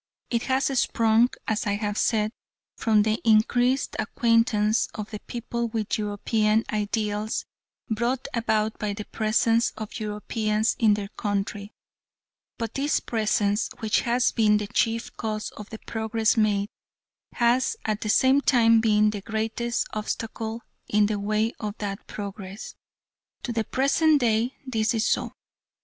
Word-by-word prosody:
It 235 -2 +1
has 265 +1 +2
sprung, 225 +1 +3 0.2
as 220 0 -1
I 200 - +1
have 205 0 -2
said, 215 -1 +1 0.4
from 215 -2 +3
the 220 +2 0
increased 245 +4 +3
acquaintance 230 -1 +2
of 210 0 -6
the 210 - -5
people 235 +1 -4
with 220 -1 -2
European 215 +1 +1
ideals 210 0 -1 0.4
brought 235 +4 -1
about 220 -2 0
by 210 -1 -2
the 210 +1 -6
presence 225 +1 +2
of 215 -1 -6
Europeans 215 +1 -1
in 215 -3 +5
their 200 -1 -5
country, 205 0 -3 0.8
but 230 -2 -4
this 285 +2 +1
presence, 215 -2 0
which 220 -2 +1
has 245 +1 +2
been 210 -2 +3
the 210 - -2
chief 230 +3 -1
cause 215 -2 -3
of 210 -1 -10
the 220 - -7
progress 220 0 0
made, 210 -2 +1 0.6
has 245 - +2
at 215 -1 -1
the 215 - -3
same 260 +5 +4
time 230 -4 +4
been 210 -1 +3
the 205 -2 -5
greatest 225 +3 -2
obstacle 220 +1 -4 0.2
in 210 0 +3
the 205 0 -1
way 215 +3 0
of 210 -1 -5
that 200 -1 -5
progress. 200 0 -7 0.7
To 245 - -3
the 225 -1 -1
present 290 +3 +3
day 235 +2 +1
this 225 -2 0
is 220 - +1
so. - - 0
220 Hz, 145 wpm, -25 LUFS, 210-230 Hz, 0.8 s, in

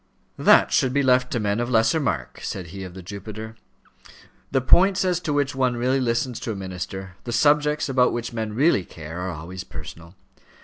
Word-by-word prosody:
"That - - +5
should 130 -1 +2
be 140 0 +2
left 125 -1 +3
to 120 - 0
men 105 0 0
of 120 +1 -1
lesser 115 +5 +3
mark," 90 - -3
said 90 -4 -5
he 95 -1 -6
of 90 -1 -9
the 95 - -9
Jupiter. 105 +4 -8 0.9
"The 135 - +2
points 190 +9 +4
as 180 -2 +1
to 160 - -3
which 145 -2 0
one 130 -2 0
really 130 +3 +1
listens 120 0 -1
to 115 - -4
a - - -4
minister, 95 0 -6
the 120 - -5
subjects 150 +3 +3
about 130 -2 +3
which 120 0 -4
men 110 -2 -3
really 135 - +3
care, 80 0 -9
are 90 +1 -3
always 90 +3 -7
personal. 85 0 -10
115 Hz, 195 wpm, -23 LUFS, 95-130 Hz, 0.9 s, That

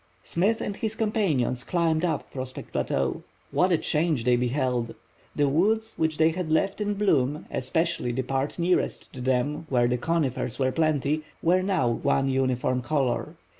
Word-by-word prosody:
Smith 205 +7 +1
and 205 0 -3
his 220 -1 -2
companions 190 - 0
climbed 165 -2 +1
up 170 -3 -1
Prospect 130 -1 -6
Plateau. 65 -1 -1 0.3
What 185 +1 +2
a 170 - +4
change 155 -5 0
they 125 +1 +4
beheld! 125 -1 -1 0.4
The 145 - +2
woods 220 +10 +1
which 160 -1 0
they 160 0 +5
had 175 -1 -4
left 195 +6 +1
in 205 0 0
bloom, 150 -8 +1
especially 160 0 -1
the 130 +2 -1
part 135 +2 -2
nearest 175 +1 0
to 130 - -7
them 130 +5 0
where 120 -2 +3
the 125 0 0
conifers 135 -6 -1
were 130 -1 +1
plenty, 155 0 +1 0.2
were 180 +2 +4
now 185 -8 +1
one 135 +3 +1
uniform 130 -1 0
color. 130 -1 -1
150 Hz, 165 wpm, -26 LUFS, 130-175 Hz, 0.4 s, they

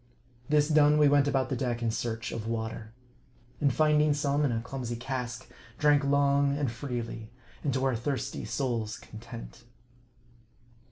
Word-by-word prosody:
This 150 -1 +4
done, 150 -1 +5
we 150 -1 +6
went 145 0 +4
about 135 -2 +1
the 130 - -1
deck 120 -1 -2
in 115 - +1
search 115 0 -3
of 110 -1 -5
water. 110 -1 -4 0.7
And 140 -2 +3
finding 150 +1 +3
some 145 0 +1
in 140 - +2
a 115 - 0
clumsy 125 0 -5
cask, 125 0 -4 0.3
drank 145 -1 +4
long 140 0 +3
and 140 -5 0
freely, 120 -3 -5 0.3
and 145 - +1
to 130 0 +1
our 130 -2 +2
thirsty 130 +4 -3
souls' 115 -2 -2
content. 115 +2 -10
130 Hz, 155 wpm, -29 LUFS, 115-145 Hz, 0.7 s, we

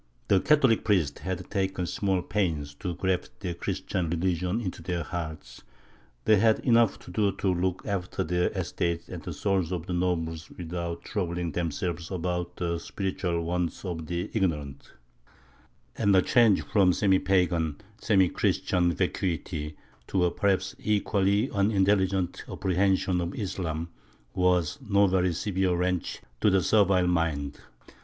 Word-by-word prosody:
The 95 - +5
Catholic 135 -2 +4
priests 90 -10 +1
had 90 +2 -4
taken 95 -2 -1
small 95 0 0
pains 80 -8 -1
to 90 -3 -3
graft 90 0 -2
the 90 -3 -3
Christian 85 0 -3
religion 90 +4 0
into 90 -7 -5
their 85 -1 -2
hearts; 80 -1 -6 0.6
they 110 - +6
had 110 +2 +4
enough 115 -3 +4
to - - -11
do 100 +2 +2
to 95 -1 0
look 90 +1 -1
after 100 -4 -2
their 90 +2 +1
estates 85 0 -2
and - - -6
the - - -6
souls 95 -4 0
of 90 -2 -3
the 90 - -4
nobles 80 -2 -1
without 85 0 -5
troubling 85 -4 -2
themselves 85 +1 -3
about 90 -1 -3
the 85 -1 -2
spiritual 90 -2 -2
wants 90 +2 -2
of 80 -4 -4
the 85 0 -3
ignorant; 75 -9 -2 1.0
and 100 -1 +3
the 95 - +5
change 115 -5 +4
from 95 -4 +3
semi 95 -1 +3
pagan, 85 -5 +1 0.2
semi 95 -5 +4
Christian, 90 0 +1
vacuity 80 -2 -2 0.3
to 90 -2 +2
a 85 - +1
perhaps 95 -1 0
equally 105 +1 +1
unintelligent 95 -2 +1
apprehension 95 -1 +1
of 85 +2 -4
Islam 85 -5 -3 0.4
was 90 - +1
no 100 -4 +3
very 90 -1 +2
severe 95 +1 0
wrench 90 -1 -1 0.2
to 105 - +4
the 95 -2 +3
servile 95 -4 +4
mind. 80 -5 0
90 Hz, 145 wpm, -27 LUFS, 85-95 Hz, 1.0 s, they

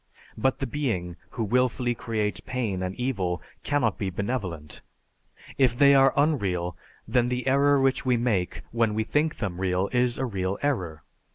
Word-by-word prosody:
But 130 0 +1
the 135 - -2
being 105 - -2
who 115 - -3
willfully 125 +2 +1
creates 110 -3 -2
pain 115 -8 -3
and 95 0 -3
evil 95 -9 -1 0.2
cannot 135 -8 0
be 100 - -1
benevolent. 95 - -4 0.8
If 125 -3 +3
they 140 0 +7
are 135 -1 +6
unreal, 95 - +1 0.3
then 125 -1 +2
the 125 0 -2
error 140 +1 +4
which 135 0 +2
we 125 -2 +2
make 110 -7 -1
when 115 -2 +1
we 110 - +1
think 150 +7 0
them 95 -4 -4
real 95 +1 0
is 125 -1 +2
a 130 - -1
real 95 -4 -2
error. 90 - -1
120 Hz, 165 wpm, -26 LUFS, 95-130 Hz, 0.8 s, they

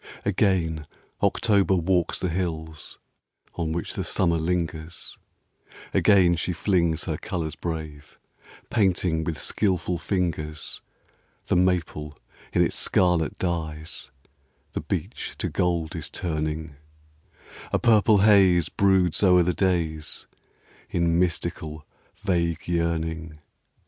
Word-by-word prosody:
^GAIN 90 -6 +1 0.3
October 100 -3 +3
walks 90 0 +1
the 90 - -1
hills 80 -3 -4 0.6
On 85 -2 -2
which 85 +1 -3
the - - -3
summer 85 -3 +1
lingers; 85 -1 -2 0.8
Again 95 -4 +5
she 90 +2 -1
flings 85 -3 +1
her - - -2
colors 80 -2 -4
brave, 80 -3 -6 0.5
Painting 90 -6 +2
with 80 -1 -3
skilful 90 -3 0
fingers 80 -5 -2 0.6
The - - +1
maple 85 -5 0 0.3
in - - +3
its - - -1
scarlet 90 -4 +2
dyes; 80 -3 -3 0.6
The - - -2
beech - - -4
to - - -2
gold 85 -3 0
is - - -5
turning; 80 -2 -3 0.9
A - - +3
purple 110 -2 +4
haze 95 -5 +5
broods 95 -4 +2
o'er 90 -3 +6
the 90 +1 +1
days 85 -5 -1 0.6
In 85 0 +1
mystical, 85 -3 -2 0.3
vague 85 -4 -1
yearning. 80 -2 -1
85 Hz, 110 wpm, -25 LUFS, 80-90 Hz, 0.9 s, o'er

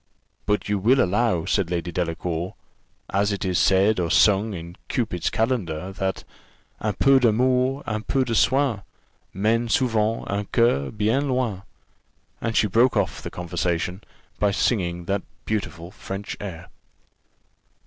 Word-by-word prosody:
"But 105 0 0
you 105 -1 0
will 125 +7 +4
allow," 100 -4 +2
said 95 -5 0
Lady 85 0 -2
Delacour, 85 0 -3 0.6
"as 100 +2 +1
it 100 -1 -3
is 90 -2 +1
said 95 +2 +4
or 85 -2 0
sung 100 +4 +4
in 85 0 -8
Cupid's 110 - -1
calendar, 95 -7 -1
that 95 0 -3 0.6
'Un 105 -1 -1
peu 135 -1 +5
d'amour, 125 +3 +2
un 110 -1 -2
peu 130 +3 0
de 120 - -2
soin, 130 -2 +2 0.5
Menent 115 +4 +1
souvent 115 -2 +1
un 100 +1 -2
coeur 115 - +2
bien 110 +7 0
loin;'" 125 -7 -1 0.8
and 115 -1 -1
she - - +4
broke 115 +4 +3
off 100 -3 -1
the - - -6
conversation 90 +2 -2 0.4
by 105 - +3
singing 90 -4 0
that 100 +2 -1 0.2
beautiful 90 -5 -3
French 100 0 -6
air. 85 -4 -7
105 Hz, 140 wpm, -24 LUFS, 90-115 Hz, 0.8 s, peu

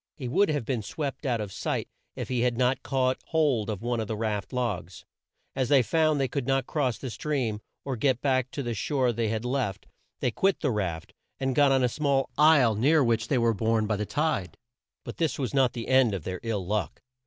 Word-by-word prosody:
He 130 - -5
would 190 +10 +3
have 145 -6 -1
been 125 -2 -1
swept 140 +4 -4
out 120 -3 +1
of 105 -2 -4
sight - - -2 0.3
if - - -4
he 125 -2 -1
had 120 -1 +1
not 125 +1 +2
caught 130 -1 0
hold 145 -10 +1
of 110 0 -4
one 120 -1 -1
of 110 - -2
the 110 - -3
raft 105 -3 -2
logs. 100 -9 -3 0.5
As 130 -2 0
they 135 -3 +5
found 155 +2 +2
they 135 - +1
could 135 -1 -3
not 135 -1 +1
cross 130 -6 -1
the 130 - -6
stream, 120 -7 -2 0.2
or 135 -2 -2
get 125 +1 +1
back 130 -2 +1
to 140 +1 -5
the 120 -1 -2
shore 130 +2 0
they 115 0 -1
had 110 +2 -2
left, 125 -6 -2 0.3
they 125 - 0
quit 195 - +1
the 140 - +1
raft, 90 -7 -3 0.3
and 135 -1 0
got 140 +1 +4
on 135 -1 +3
a - - +4
small 140 +1 0
isle 150 -6 +5
near 140 +8 +3
which 115 -2 +1
they 135 - +1
were 115 -1 +3
borne 110 +1 +1
by 110 0 0
the 105 0 -3
tide. 145 - -1 0.5
But - - -7
this 165 -3 0
was 130 -2 -3
not 135 -3 +3
the 120 -2 -5
end 130 -5 +4
of 90 - -5
their 90 +1 -4
ill 105 -5 -2
luck. 100 -4 -2
125 Hz, 230 wpm, -27 LUFS, 110-140 Hz, 0.5 s, they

